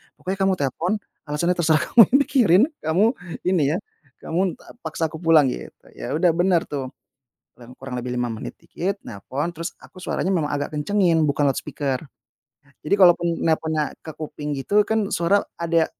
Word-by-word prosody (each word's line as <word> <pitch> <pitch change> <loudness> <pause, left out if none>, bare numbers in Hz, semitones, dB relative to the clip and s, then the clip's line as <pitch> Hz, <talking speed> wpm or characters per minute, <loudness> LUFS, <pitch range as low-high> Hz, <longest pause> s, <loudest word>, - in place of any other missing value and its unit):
"Pokoknya 190 +2 -4
kamu 195 0 +3
telepon 165 +3 -2 0.4
alasannya 170 +5 0
terserah 160 -2 +3
kamu 235 - +9 0.2
pikirin, 215 - +4 0.2
kamu 160 +7 +2 0.4
ini 180 -4 +2
ya, - - 0 0.5
kamu 180 +2 0
ta - - -16
paksa 160 -9 -3
aku 160 - -8
pulang," 160 -5 +4
gitu. - - -6 0.2
Ya - - -5
udah 170 +2 +4
bener 175 0 +2
tuh, 135 -3 -6 0.6
kurang 120 0 -14
kurang 135 -1 -6
lebih 125 - -4
5 120 - 0
menit 110 -2 -7
dikit, 185 +4 -4
nelpon, 135 - -4
terus 165 +2 -4
aku 185 - -14
suaranya - - -2
memang 160 -6 0
agak 145 +1 -3
kencengin, 170 +1 +2
bukan 145 -1 +2
loudspeaker. 135 -1 -2 0.8
Jadi 150 - -1
kalaupun 175 -3 +5
nelponnya 160 -2 0
ke 160 - -8
kuping 150 -2 -5
gitu, 200 +10 +2
kan 210 -1 -1
suara 175 +4 +2 0.2
ada 165 -1 +2
165 Hz, 165 wpm, -23 LUFS, 145-180 Hz, 0.8 s, kamu